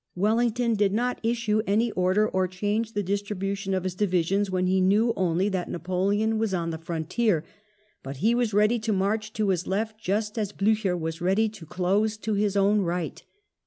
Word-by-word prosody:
Wellington 230 +4 +1
did 205 -2 +2
not 245 +3 0
issue 225 -2 +1
any 220 +3 +2
order 185 +3 +2
or 185 -2 0
change 210 +5 -2
the 205 - -1
distribution 200 0 -2
of 185 - -1
his 185 -1 -2
divisions 190 +1 +1
when 185 -1 0
he 185 +1 +2
knew 210 +5 +3
only 185 +1 +1
that 185 -3 -3
Napoleon 200 +5 0
was 220 -4 0
on 165 -1 -2
the 160 - -5
frontier, 170 +3 -1 0.6
but 135 +1 -7
he 220 - +2
was 240 -1 +1
prepared 210 +3 +2
to 220 -1 0
march 215 +3 -1
to 210 -2 0
his 185 -2 0
left 215 +3 -2
just 210 +2 -1
as 205 -1 -2
Blucher 205 -3 +1
was 165 0 -4
ready 195 +5 +2
to 185 -7 -12
close 200 +6 0
to 215 0 -3
his 205 -1 +1
own 200 +1 +3
right. 175 -3 -3
200 Hz, 190 wpm, -26 LUFS, 185-215 Hz, 0.6 s, knew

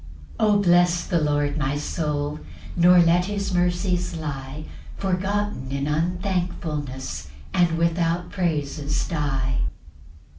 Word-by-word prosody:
2 - - +4
O 210 -1 +5
bless 175 -2 +4
the 170 - +1
Lord, 145 0 +1
my 145 0 0
soul; 150 -1 -2 0.4
Nor 180 +1 +6
let 170 +1 +4
his 200 -1 -2
mercies 180 0 +1
lie 145 -1 -5 0.3
Forgotten 195 -6 -1
in 140 0 -1
unthankfulness, 155 - -2 0.3
And 170 -2 +3
without 170 +1 0
praises 150 -4 -1
die. 140 -5 -1
165 Hz, 110 wpm, -24 LUFS, 145-180 Hz, 0.4 s, Nor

